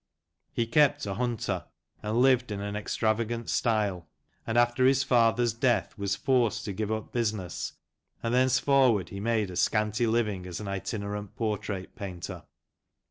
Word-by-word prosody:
He 115 Hz, -, 0 dB
kept 135 Hz, +3 st, +3 dB
a 100 Hz, -, -2 dB
hunter, 120 Hz, +1 st, -2 dB, 0.4 s
and 110 Hz, +4 st, +1 dB
lived 130 Hz, -3 st, +3 dB
in 100 Hz, -, -3 dB
an 100 Hz, 0 st, -4 dB
extravagant 115 Hz, +2 st, -1 dB
style, 105 Hz, -8 st, 0 dB, 0.4 s
and 115 Hz, -, 0 dB
after 120 Hz, +1 st, +4 dB
his 135 Hz, 0 st, +4 dB
father's 120 Hz, -2 st, +3 dB
death 120 Hz, +1 st, +1 dB
was 100 Hz, -2 st, -1 dB
forced 120 Hz, -2 st, +1 dB
to 100 Hz, -, -3 dB
give 105 Hz, +2 st, -2 dB
up 110 Hz, -1 st, -3 dB
business, 105 Hz, -7 st, -2 dB, 0.5 s
and 115 Hz, 0 st, 0 dB
thence 130 Hz, 0 st, +4 dB
forward 130 Hz, -9 st, +3 dB
he 100 Hz, -, -6 dB
made 110 Hz, -2 st, 0 dB
a -, -, -7 dB
scanty 105 Hz, +4 st, +1 dB
living 105 Hz, -5 st, 0 dB
as 90 Hz, -2 st, -5 dB
an 105 Hz, -, -6 dB
itinerant 100 Hz, +1 st, -4 dB
portrait 105 Hz, -4 st, -3 dB
painter. 90 Hz, -4 st, -6 dB
110 Hz, 155 wpm, -28 LUFS, 100-120 Hz, 0.5 s, after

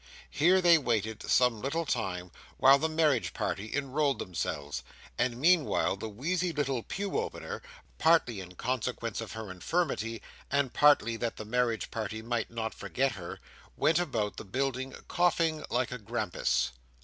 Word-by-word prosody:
Here 180 Hz, +5 st, +4 dB
they 170 Hz, -2 st, +7 dB
waited 110 Hz, -5 st, -1 dB
some 125 Hz, -4 st, +3 dB
little 165 Hz, +5 st, -1 dB
time 95 Hz, -, -2 dB, 0.3 s
while 135 Hz, +1 st, +7 dB
the 160 Hz, -, 0 dB
marriage 155 Hz, -6 st, +2 dB
party 105 Hz, +3 st, -3 dB
enrolled 140 Hz, 0 st, +1 dB
themselves; 75 Hz, -5 st, -3 dB, 0.3 s
and 120 Hz, -1 st, 0 dB
meanwhile 160 Hz, -, +3 dB
the 110 Hz, +3 st, -6 dB
wheezy 170 Hz, -, -1 dB
little 135 Hz, -5 st, -1 dB
pew 200 Hz, -, -2 dB
opener—partly 165 Hz, -, -1 dB
in 90 Hz, -1 st, -9 dB
consequence 120 Hz, -1 st, -2 dB
of 115 Hz, -, -7 dB
her 110 Hz, -3 st, -6 dB
infirmity, 115 Hz, -, -1 dB, 0.3 s
and 140 Hz, -2 st, +1 dB
partly 120 Hz, -6 st, +5 dB
that 115 Hz, -1 st, -3 dB
the 110 Hz, -, -6 dB
marriage 120 Hz, 0 st, 0 dB
party 110 Hz, -1 st, -4 dB
might 115 Hz, -1 st, -1 dB
not 115 Hz, -1 st, -3 dB
forget 135 Hz, +1 st, -1 dB
her—went 110 Hz, -, -2 dB
about 115 Hz, -12 st, -1 dB
the -, -, -5 dB
building 130 Hz, +4 st, -2 dB
coughing 165 Hz, -3 st, +2 dB
like 130 Hz, -, 0 dB
a 125 Hz, -, -4 dB
grampus. 105 Hz, -, 0 dB
125 Hz, 145 wpm, -30 LUFS, 110-150 Hz, 0.3 s, they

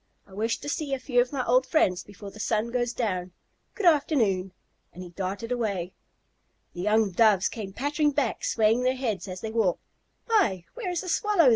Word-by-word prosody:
I 195 Hz, -, -18 dB
wish 225 Hz, +3 st, -1 dB
to -, -, -7 dB
see 290 Hz, -1 st, -1 dB
a -, -, -7 dB
few 250 Hz, -1 st, +2 dB
of 245 Hz, -, -2 dB
my 270 Hz, -3 st, -2 dB
old 255 Hz, +2 st, +3 dB
friends 185 Hz, -, +2 dB
before 200 Hz, 0 st, -11 dB
the 215 Hz, -, -13 dB
sun 220 Hz, +2 st, 0 dB
goes 240 Hz, -1 st, 0 dB
down. 185 Hz, -7 st, -2 dB, 0.4 s
Good 420 Hz, -, -3 dB
afternoon!" 235 Hz, -, +3 dB, 0.4 s
And 180 Hz, -, -9 dB
he 180 Hz, -, -9 dB
darted 195 Hz, +6 st, -4 dB
away. 200 Hz, -7 st, -2 dB, 0.8 s
The 175 Hz, -, -6 dB
young 210 Hz, +1 st, +2 dB
Doves 210 Hz, -1 st, +4 dB
came 210 Hz, -4 st, -6 dB
pattering 290 Hz, +7 st, 0 dB
back, 280 Hz, -5 st, -1 dB
swaying 225 Hz, +2 st, +2 dB
their 255 Hz, +1 st, +1 dB
heads 220 Hz, -8 st, -3 dB
as 185 Hz, -1 st, -7 dB
they 220 Hz, -, -4 dB
walked. 220 Hz, -6 st, +1 dB, 0.4 s
"Why, 215 Hz, -, +2 dB
where 460 Hz, -6 st, -4 dB
is 355 Hz, -2 st, -1 dB
the 370 Hz, -, -6 dB
Swallow?" 390 Hz, -, +4 dB
225 Hz, 195 wpm, -27 LUFS, 195-270 Hz, 0.8 s, Doves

